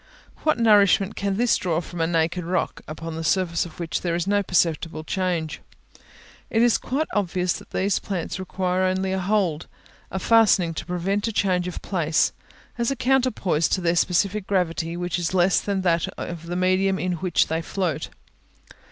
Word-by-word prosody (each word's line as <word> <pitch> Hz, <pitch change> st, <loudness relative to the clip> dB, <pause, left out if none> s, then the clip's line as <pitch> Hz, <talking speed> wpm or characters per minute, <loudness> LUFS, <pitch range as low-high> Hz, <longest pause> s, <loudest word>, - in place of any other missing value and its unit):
What 310 Hz, -, +2 dB
nourishment 205 Hz, -4 st, +4 dB
can 200 Hz, -1 st, -1 dB
this 240 Hz, 0 st, +3 dB
draw 170 Hz, -3 st, -1 dB
from 175 Hz, 0 st, -6 dB
a 165 Hz, -, +2 dB
naked 170 Hz, +1 st, 0 dB
rock, 180 Hz, +2 st, -2 dB
upon 160 Hz, +1 st, -6 dB
the 165 Hz, -, -4 dB
surface 175 Hz, 0 st, +1 dB
of 165 Hz, -, -15 dB
which 165 Hz, -3 st, -2 dB
there 170 Hz, -2 st, -1 dB
is 175 Hz, 0 st, -1 dB
no 205 Hz, +1 st, +2 dB
perceptible 165 Hz, -3 st, 0 dB
change? 170 Hz, -2 st, -2 dB, 0.9 s
It 225 Hz, +1 st, +2 dB
is 240 Hz, -4 st, +4 dB
quite 280 Hz, +5 st, -1 dB
obvious 180 Hz, -3 st, 0 dB
that -, -, -10 dB
these 195 Hz, +1 st, 0 dB
plants 185 Hz, -2 st, -4 dB
require 185 Hz, 0 st, -1 dB
only 185 Hz, 0 st, 0 dB
a 190 Hz, -, 0 dB
hold, 185 Hz, -5 st, 0 dB, 0.4 s
a 190 Hz, -, -4 dB
fastening 195 Hz, -5 st, +4 dB
to 160 Hz, -, -6 dB
prevent 190 Hz, +4 st, -1 dB
a -, -, -1 dB
change 185 Hz, -4 st, +1 dB
of 180 Hz, -, -6 dB
place, 165 Hz, -5 st, +1 dB, 0.5 s
as 235 Hz, -, +1 dB
a 275 Hz, -, -1 dB
counterpoise 250 Hz, -, +1 dB
to -, -, +1 dB
their 170 Hz, 0 st, +1 dB
specific 190 Hz, +3 st, +1 dB
gravity, 170 Hz, -3 st, -1 dB
which 175 Hz, 0 st, -2 dB
is 175 Hz, +2 st, -2 dB
less 180 Hz, +1 st, +3 dB
than 200 Hz, -2 st, -1 dB
that 170 Hz, -2 st, +1 dB
of 170 Hz, -1 st, -6 dB
the 175 Hz, -, -3 dB
medium 185 Hz, +1 st, +2 dB
in 180 Hz, -1 st, -2 dB
which 180 Hz, 0 st, +2 dB
they 160 Hz, +1 st, -2 dB
float. 175 Hz, -2 st, -2 dB
180 Hz, 180 wpm, -24 LUFS, 170-195 Hz, 0.9 s, nourishment